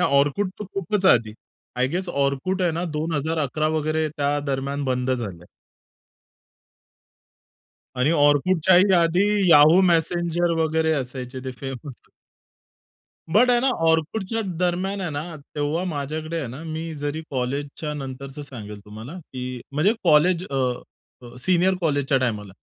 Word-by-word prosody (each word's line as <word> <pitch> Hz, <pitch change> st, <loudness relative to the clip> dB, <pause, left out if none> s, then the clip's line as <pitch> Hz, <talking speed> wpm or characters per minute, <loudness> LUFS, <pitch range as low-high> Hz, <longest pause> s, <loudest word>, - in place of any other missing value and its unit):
हे -, -, +3 dB
Orkut 145 Hz, +8 st, +1 dB
तर 210 Hz, -, -5 dB
खूपच 195 Hz, +1 st, 0 dB
आधी. 110 Hz, -2 st, -1 dB, 0.4 s
आय 125 Hz, -, +2 dB
गेस 180 Hz, +3 st, -3 dB, 0.2 s
Orkut 185 Hz, +8 st, -1 dB
आहे 175 Hz, -, +2 dB
ना 170 Hz, +2 st, -2 dB
2011 155 Hz, -1 st, -1 dB
वगैरे 155 Hz, +1 st, 0 dB
त्यादरम्यान 140 Hz, -1 st, -1 dB
बंद 130 Hz, 0 st, -1 dB
झालं 120 Hz, -4 st, -3 dB
आहे. -, -, -16 dB, 2.5 s
आणि 130 Hz, +5 st, +3 dB
Orkutच्याही 165 Hz, +5 st, +4 dB, 0.2 s
आधी 170 Hz, +3 st, +3 dB, 0.3 s
Yahoo! 155 Hz, +4 st, +8 dB
Messenger 170 Hz, +1 st, +1 dB
वगैरे 160 Hz, 0 st, +1 dB
असायचे 130 Hz, -2 st, -4 dB
ते 130 Hz, -, -3 dB
फेमस 135 Hz, -1 st, -7 dB, 1.3 s
बट 245 Hz, +6 st, +5 dB
आहे 240 Hz, -1 st, +4 dB
ना 270 Hz, -, +2 dB, 0.2 s
Orkutच्याच 190 Hz, +7 st, 0 dB
दरम्यान 185 Hz, +2 st, -1 dB
आहे 175 Hz, -3 st, -3 dB
ना, 155 Hz, +3 st, -5 dB, 0.2 s
तेव्हा 150 Hz, +4 st, -1 dB
माझ्याकडे 155 Hz, +2 st, -3 dB
आहे 145 Hz, -, -3 dB
ना 130 Hz, +6 st, -8 dB
मी 160 Hz, 0 st, -5 dB
जरी 145 Hz, +2 st, -4 dB
कॉलेजच्या 140 Hz, +4 st, -3 dB
नंतरचं 135 Hz, +1 st, -7 dB
सांगेल 105 Hz, -7 st, -9 dB
तुम्हाला 110 Hz, +9 st, -9 dB
की 125 Hz, -4 st, -7 dB
म्हणजे 165 Hz, +10 st, +3 dB
कॉलेज 170 Hz, +2 st, +4 dB
अ, -, -, -4 dB, 0.7 s
अ, 120 Hz, 0 st, -12 dB
सीनियर 185 Hz, +4 st, +3 dB
कॉलेजच्या 145 Hz, -4 st, +1 dB
टायमाला. 105 Hz, -6 st, -2 dB
150 Hz, 130 wpm, -23 LUFS, 135-175 Hz, 2.5 s, Yahoo